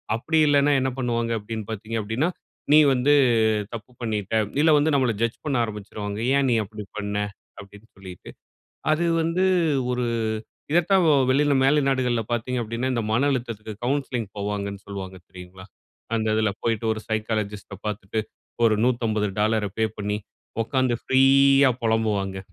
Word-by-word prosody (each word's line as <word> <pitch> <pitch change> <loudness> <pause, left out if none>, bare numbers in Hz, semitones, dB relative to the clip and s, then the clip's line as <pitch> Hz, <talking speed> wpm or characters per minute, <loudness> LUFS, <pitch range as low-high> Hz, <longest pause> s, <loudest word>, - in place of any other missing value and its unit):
அப்படி 155 +7 0
இல்லைனா 145 0 +4
என்ன 130 - +1
பண்ணுவாங்க 115 -2 -1
அப்படீன்னு 110 +1 -6
பாத்தீங்க 110 +1 -4
அப்படீன்னா, 110 +10 -1 0.4
"நீ 155 - +8
வந்து 130 +3 +3 0.6
தப்பு 115 +1 -8
பண்ணீட்ட" 105 -3 -3 0.3
இல்ல 160 - +5
வந்து 150 +1 +2
நம்மளை 130 -4 +2
ஜட்ஜ் 115 0 0
பண்ண 145 -3 -1
ஆரம்பிச்சிருவாங்க. 105 -1 -6 0.2
"ஏன் 140 - +2
நீ - - +3
அப்படி 105 0 -9
பண்ண?" 105 0 -3 0.4
அப்படின்னு 105 +2 -15
சொல்லிட்டு. 95 -2 -11 0.6
அது 165 +3 +1 0.2
வந்து 165 +3 0 0.5
ஒரு 125 -1 -1 0.7
இதை 170 - +5
தான் 190 -1 +5 0.3
வெளியில 145 +2 +3
மேலை 150 +3 +4
நாடுகள்ல 125 -3 +1
பாத்தீங்க 120 +2 -1
அப்படீன்னா, 115 +3 -3
இந்த 120 - 0
மன 135 +6 +2
அழுத்தத்துக்கு 115 -4 -4
கவுன்சிலிங் 130 -3 -1
போவாங்கன்னு 100 -1 -4
சொல்வாங்க 95 -2 -7
தெரியுங்களா? 90 0 -12 0.5
அந்த 110 -1 0
இதில 110 -1 +1
போய்ட்டு, 115 -1 -1
ஒரு 110 - -5
சைக்காலஜிஸ்ட்‌ட 105 -2 -3
பார்த்துட்டு, 105 +1 -3 0.4
ஒரு 110 -2 +4
$150ஐ 110 -3 0
பே 110 - +3
பண்ணி, 105 0 -2 0.5
உட்காந்து 130 +1 0
ஃப்ரீயா 135 +1 +5
பொலம்புவாங்க 105 -4 0
115 Hz, 140 wpm, -24 LUFS, 105-130 Hz, 0.7 s, நீ